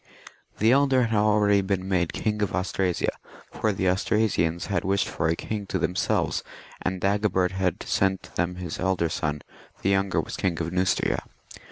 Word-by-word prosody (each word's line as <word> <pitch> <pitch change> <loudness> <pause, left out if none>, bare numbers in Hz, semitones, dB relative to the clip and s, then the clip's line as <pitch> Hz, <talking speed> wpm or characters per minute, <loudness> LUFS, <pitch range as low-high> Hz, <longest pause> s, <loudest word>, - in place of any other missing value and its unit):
The 110 +2 +4
elder 135 -1 +4
had 115 -2 +1
already 105 -1 +4
been 95 -1 -2
made 90 -3 +1
King 105 -1 -2
of 105 - 0
Austrasia, 90 -1 0 0.4
for 110 - 0
the 95 -1 -1
Austrasians 90 -3 +1
had 100 -3 -1
wished 95 0 +1
for 80 - -1
a 80 - +2
king 105 +2 -4
to 95 - -1
themselves, 90 +1 0 0.4
and 95 0 -2
Dagobert 95 -1 +1
had 95 -2 -1
sent 95 -1 0
them 85 +1 -1
his 90 -2 -5
elder 95 -3 +1
son 75 -2 -2 0.4
;• - - -24
the 95 - +2
younger 95 -1 +1
was - - -4
King 90 -3 -1
of 85 0 -2
Neustria. 95 0 +1
95 Hz, 175 wpm, -26 LUFS, 90-105 Hz, 0.4 s, The